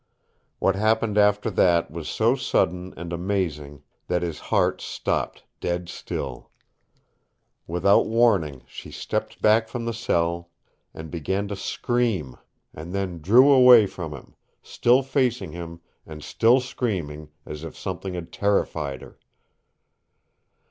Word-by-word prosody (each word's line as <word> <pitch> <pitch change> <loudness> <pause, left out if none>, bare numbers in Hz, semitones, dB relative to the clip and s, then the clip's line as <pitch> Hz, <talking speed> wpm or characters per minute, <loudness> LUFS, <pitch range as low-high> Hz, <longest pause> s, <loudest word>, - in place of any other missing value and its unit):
What 95 - +1
happened 110 +1 +1
after 105 +1 +3
that 85 -4 +2
was 80 -1 -6
so 115 +2 +2
sudden 90 -7 0
and 85 +1 -6
amazing 85 -6 -3 0.2
that 90 -1 0
his 85 -3 -4
heart - - 0
stopped - - -3 0.2
dead 85 0 -3
still. 65 -3 -6 1.2
Without 90 +4 +3
warning 100 - +2
she - - -10
stepped - - -4
back 110 +1 +4
from 120 -1 -5
the 115 - -2
cell 85 -6 -1 0.4
and 80 -1 -9
began 95 +5 -2
to 100 - -3
scream 100 - -1 0.4
and 80 +4 -8
then 95 -4 -3
drew 125 - +6
away 125 -4 +8
from 85 -5 -6
him, 70 -4 -11 0.3
still 125 +3 +2
facing 125 - 0
him 85 0 -8 0.2
and 75 -1 -10
still 120 +3 +3
screaming, 90 - -4 0.2
as 75 +1 -8
if 80 - -8
something 95 0 -5
had 85 -2 -7
terrified 80 -9 -1
her. - - -15
90 Hz, 130 wpm, -24 LUFS, 80-110 Hz, 1.2 s, away